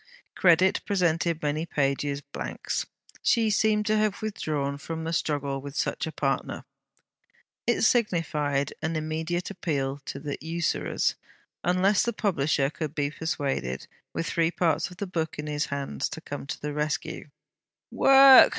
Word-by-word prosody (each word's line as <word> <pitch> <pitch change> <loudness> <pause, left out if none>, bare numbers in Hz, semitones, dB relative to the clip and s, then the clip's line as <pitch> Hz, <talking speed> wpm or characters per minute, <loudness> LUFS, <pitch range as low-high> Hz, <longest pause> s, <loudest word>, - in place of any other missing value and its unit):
Credit 185 +1 +4
presented 170 -4 +1
many 150 +2 0
pages 140 -1 0
blanks. 140 - -4 0.3
She 225 -2 +3
seemed 210 0 +2
to 215 0 +2
have 215 -2 +1
withdrawn 145 -9 -2
from 160 +2 -5
the 165 +1 -2
struggle 140 -4 -1
with 140 0 -8
such - - -1
a - - -4
partner. 135 -3 -2 1.0
It 240 - +2
signified 150 - +1
an 160 +1 -1
immediate 160 +4 -2
appeal 145 -7 -2
to - - -5
the 145 0 -5
usurers, 165 +1 0 0.5
unless 185 +3 +3
the 235 - 0
publisher 150 -9 +1
could 155 -1 -5
be 145 -1 0
persuaded, 140 - -2 0.3
with 165 - -3
three 165 -1 +1
parts 165 -2 +1
of 180 - -13
the 200 - -3
book 165 -4 -3
in 150 - -4
his 150 -1 -1
hands, 140 - -3
to - - -7
come 145 -1 -6
to 160 - -4
the 150 0 -4
rescue. 150 0 -3 0.6
Work! 270 -1 +9
160 Hz, 150 wpm, -27 LUFS, 145-180 Hz, 1.0 s, Work